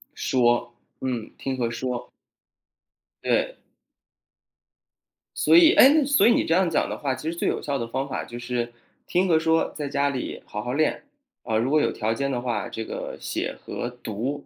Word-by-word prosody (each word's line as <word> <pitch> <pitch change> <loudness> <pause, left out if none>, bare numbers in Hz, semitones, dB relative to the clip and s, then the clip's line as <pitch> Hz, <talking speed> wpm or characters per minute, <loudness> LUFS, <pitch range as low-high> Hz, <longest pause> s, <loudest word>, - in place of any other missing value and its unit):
说， 120 -1 +1 0.3
嗯， 125 -4 -3
听 135 -1 -3
和 120 -2 0
说。 120 +1 -4 1.1
对。 - - 0 1.8
所 - - +4
以 340 0 +8
诶， 285 +2 +7
所 280 -3 +4
以 - - +6
你 - - +2
这 165 - +1
样 180 0 +3
讲 - - +1
的 - - -4
话， 135 -3 -1
其 150 +5 -4
实 170 - -4
最 - - -1
有 - - 0
效 140 -1 -2
的 115 -3 -3
方 135 +3 -3
法 - - -3
就 120 - -8
是， 120 -1 -3 0.3
听 185 +2 +2
和 165 -3 +4
说 160 0 +2
在 145 -2 -4
家 140 0 +1
里 130 -3 -4
好 105 - -5
好 125 +1 -3
练。 155 +1 +1 0.4
啊， 110 - 0
如 125 +5 0
果 155 - +4
有 - - +1
条 110 +1 -1
件 140 +4 -2
的 125 - -1
话， 115 -6 -2
这 115 - -5
个 - - -6
写 - - -3
和 120 - -4
读 125 +4 -5
130 Hz, 205 characters per minute, -25 LUFS, 120-160 Hz, 1.8 s, 以